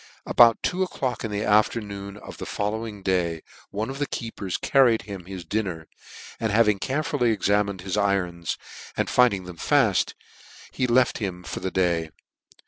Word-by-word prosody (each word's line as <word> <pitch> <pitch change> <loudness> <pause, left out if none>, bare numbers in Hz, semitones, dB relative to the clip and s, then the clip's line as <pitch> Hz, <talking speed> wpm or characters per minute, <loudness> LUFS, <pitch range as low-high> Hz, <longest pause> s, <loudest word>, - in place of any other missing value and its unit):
About 115 -1 +5
two 185 +1 0
o'clock 130 -10 -2
iA 115 - -2
the 105 0 -2
afternoon 105 -2 +1
cf 105 - -10
the - - -6
fol 105 0 -1
lowing 110 -2 -6
day 85 -4 0 0.3
one 105 +2 -3
of 135 +1 -6
the 145 - 0
keepers 110 -6 -4
carried 125 -5 +4
him 100 -4 -8
his 95 -2 -7
din 110 +5 0
ner, 80 -4 -6 0.5
and 110 -2 0
having 105 -2 +4
carefully 145 -1 0
examined 100 -2 +1
his 95 +1 -3
irons, 90 -4 0 0.4
and - - 0
finding 115 -7 +4
them 90 -1 -9
faft, - - +2 0.6
he 130 - 0
left 125 +2 +3
him 90 -4 -4
for - - -5
the 95 - -2
day. 85 -4 +1
105 Hz, 170 wpm, -25 LUFS, 95-115 Hz, 0.6 s, About